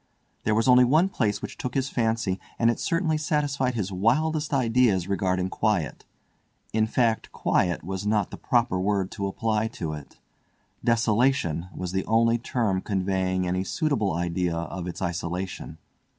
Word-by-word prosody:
There 110 Hz, -, +2 dB
was 115 Hz, +3 st, +2 dB
only 125 Hz, 0 st, +7 dB
one 155 Hz, +9 st, +4 dB
place 105 Hz, -, -1 dB
which -, -, -7 dB
took 125 Hz, -, -4 dB
his 135 Hz, 0 st, 0 dB
fancy, 110 Hz, -5 st, 0 dB, 0.2 s
and 115 Hz, 0 st, +4 dB
it -, -, -5 dB
certainly 165 Hz, -3 st, 0 dB
satisfied 145 Hz, -4 st, 0 dB
his 100 Hz, -4 st, -2 dB
wildest 150 Hz, -, +1 dB
ideas 115 Hz, -8 st, +2 dB
regarding 95 Hz, -1 st, 0 dB
quiet; 100 Hz, -10 st, -1 dB, 0.7 s
in 110 Hz, 0 st, +2 dB
fact, 115 Hz, -1 st, +1 dB
quiet 90 Hz, -1 st, 0 dB
was 95 Hz, +2 st, -4 dB
not 105 Hz, -2 st, +1 dB
the -, -, -7 dB
proper 120 Hz, -6 st, +1 dB
word 95 Hz, 0 st, 0 dB
to 100 Hz, -3 st, -3 dB
apply 110 Hz, +2 st, 0 dB
to 80 Hz, -8 st, -5 dB
it—desolation 110 Hz, -, -1 dB
was 90 Hz, -1 st, -5 dB
the 95 Hz, 0 st, -1 dB
only 115 Hz, +1 st, +3 dB
term 110 Hz, -6 st, 0 dB
conveying 95 Hz, -1 st, 0 dB
any 90 Hz, +1 st, 0 dB
suitable 120 Hz, -, 0 dB
idea 85 Hz, 0 st, -1 dB
of 85 Hz, +2 st, -4 dB
its 90 Hz, +1 st, -5 dB
isolation. 85 Hz, -1 st, -4 dB
105 Hz, 150 wpm, -26 LUFS, 95-120 Hz, 0.7 s, only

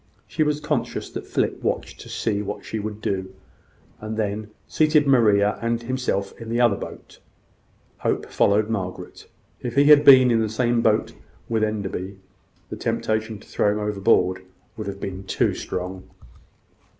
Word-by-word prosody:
She 155 Hz, -, -3 dB
was 150 Hz, -1 st, +2 dB
conscious -, -, -3 dB
that -, -, -7 dB
Philip -, -, -1 dB
watched -, -, -3 dB
to -, -, -11 dB
see 105 Hz, -2 st, -1 dB
what 105 Hz, 0 st, -6 dB
she 110 Hz, -, -4 dB
would 105 Hz, 0 st, -5 dB
do, 95 Hz, -1 st, -3 dB, 0.6 s
and 110 Hz, +1 st, -5 dB
then 105 Hz, 0 st, -2 dB, 0.2 s
seated 155 Hz, -1 st, +3 dB
Maria 105 Hz, -7 st, +3 dB
and 115 Hz, 0 st, 0 dB
himself 120 Hz, -6 st, -2 dB
in 115 Hz, -, -7 dB
the 120 Hz, +1 st, 0 dB
other 120 Hz, -4 st, +4 dB
boat. -, -, -10 dB, 0.8 s
Hope -, -, -1 dB
followed 105 Hz, +1 st, +2 dB
Margaret. 95 Hz, -5 st, -5 dB, 0.3 s
If 120 Hz, -1 st, -4 dB
he 140 Hz, -, +6 dB
had 145 Hz, 0 st, +7 dB
been 130 Hz, -3 st, +8 dB
in 115 Hz, -, +3 dB
the 110 Hz, -, 0 dB
same 120 Hz, +1 st, +1 dB
boat 110 Hz, -1 st, +1 dB, 0.3 s
with 110 Hz, -1 st, 0 dB
Enderby, 100 Hz, -3 st, -3 dB, 0.5 s
the -, -, -5 dB
temptation 110 Hz, 0 st, -2 dB
to -, -, -17 dB
throw 105 Hz, -, +1 dB
him 105 Hz, -, -3 dB
overboard 100 Hz, -2 st, +1 dB, 0.3 s
would 110 Hz, -2 st, -6 dB
have 100 Hz, 0 st, -5 dB
been 95 Hz, 0 st, -5 dB
too -, -, +1 dB
strong. 95 Hz, +1 st, -5 dB
110 Hz, 160 wpm, -23 LUFS, 100-120 Hz, 0.8 s, been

